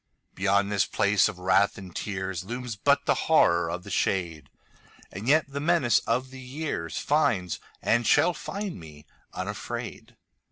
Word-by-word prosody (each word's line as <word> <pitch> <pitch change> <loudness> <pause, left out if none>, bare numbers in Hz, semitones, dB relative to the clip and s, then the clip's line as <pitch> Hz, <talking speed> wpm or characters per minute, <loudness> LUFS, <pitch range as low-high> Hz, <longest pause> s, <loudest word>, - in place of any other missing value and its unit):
Beyond 100 +1 +1
this 100 -2 +2
place 100 +1 +3
of 105 - -8
wrath 95 +2 +2
and 95 -3 -10
tearsLooms 100 +5 -4
but 100 - +2
the - - +4 0.2
Horror 85 -1 +4
of 90 +2 -4
the 100 - -9
shade, 85 -5 -1 0.6
And 100 +5 -7
yet 155 +2 +4
the 140 0 -5
menace 150 -5 +3
of 125 +3 0
the 130 0 -10
yearsFinds, 125 - -1 0.2
and 120 +1 +2
shall 175 - +4
find, 200 - -5
me 75 -2 -13 0.3
unafraid. - - -6
100 Hz, 145 wpm, -27 LUFS, 90-130 Hz, 0.6 s, the